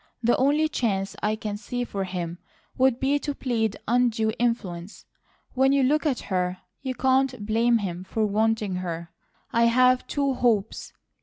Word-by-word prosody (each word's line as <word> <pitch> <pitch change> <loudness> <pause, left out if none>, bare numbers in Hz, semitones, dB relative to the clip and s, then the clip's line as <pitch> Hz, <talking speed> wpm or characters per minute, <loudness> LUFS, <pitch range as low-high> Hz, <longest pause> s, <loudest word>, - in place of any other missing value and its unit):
The 240 +1 +4
only 290 +4 +3
chance 200 -9 -1
I 210 +1 +1
can 210 -1 -4
see 245 +3 -4
for 200 -5 -3
him 175 -2 -5 0.4
would 260 -1 +3
be 280 +2 +2
to 290 -1 -4
plead 225 -6 -1
undue 230 -2 +2
influence. 205 -6 -2 0.5
When 265 +1 +3
you 280 -1 +3
look 305 +4 +2
at 265 -4 0
her, 180 -1 -1 0.2
you 260 -1 -3
can't 260 -4 +1
blame 230 +2 +3
him 185 -4 -4
for 215 +3 -1
wanting 215 -2 0
her. 170 -2 -5 0.4
I've 250 +2 +4
two 280 -2 0
hopes. 225 -5 0
230 Hz, 155 wpm, -25 LUFS, 200-255 Hz, 0.5 s, The